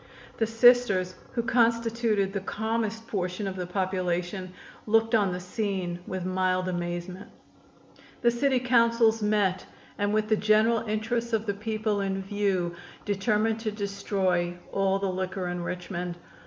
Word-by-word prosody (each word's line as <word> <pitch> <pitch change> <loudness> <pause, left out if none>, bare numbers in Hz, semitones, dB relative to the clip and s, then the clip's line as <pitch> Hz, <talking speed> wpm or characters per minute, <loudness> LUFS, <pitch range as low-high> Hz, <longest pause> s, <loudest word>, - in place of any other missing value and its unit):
The 225 - +2
Sisters, 225 -5 +4 0.2
who 235 - 0
constituted 230 -4 +2
the 200 - -1
calmest 225 +2 -2
portion 185 -1 -2
of 190 - -4
the 180 -1 -4
population, 185 0 -2 0.4
looked 225 +1 +3
on 205 -4 +3
the 180 - -3
scene 180 -2 -3
with 185 -1 -4
mild 185 0 0
amazement. 175 +1 -4 0.9
The 240 - +4
City 260 +2 +2
Councils 230 -2 +3
met 210 -3 +1 0.3
and 205 0 +1
with 215 0 +1
the 215 0 +3
general 215 +2 +4
interests 230 +2 -1
of 220 0 +1
the 200 - 0
people 215 0 -1
in 195 0 -2
view 195 -3 0 0.3
determined 215 +2 +1
to 220 -1 -2
destroy 195 -4 -1
all 195 0 +2
the 195 0 -1
liquor 185 0 -3
in 175 0 -3
Richmond. 175 0 -4
205 Hz, 140 wpm, -27 LUFS, 185-225 Hz, 0.9 s, Sisters